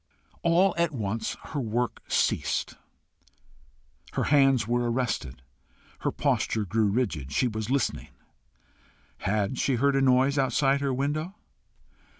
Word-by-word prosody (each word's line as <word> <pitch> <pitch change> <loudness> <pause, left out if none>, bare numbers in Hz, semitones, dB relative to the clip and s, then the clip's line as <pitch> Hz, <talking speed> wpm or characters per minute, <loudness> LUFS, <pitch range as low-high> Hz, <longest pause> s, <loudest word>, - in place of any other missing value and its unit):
All 175 +3 +3
at 170 -1 +2
once 110 -2 -3
her 150 - -2
work 120 0 -2
ceased, - - 0 1.4
her - - 0
hands 135 -5 +4
were 120 0 +1
arrested, 75 - -3 0.6
her - - -1
posture 110 -2 0
grew 110 +2 +1
rigid: 90 - -1
she 125 - +2
was 110 -1 -4
listening. 135 -1 -1 1.1
HAD 105 +5 -1
she 135 - +1
heard 140 +3 +2
a 135 - +3
noise 135 +2 +3
outside 135 +1 +2
her 140 -1 0
window? 150 +8 -2
125 Hz, 125 wpm, -27 LUFS, 110-140 Hz, 1.4 s, hands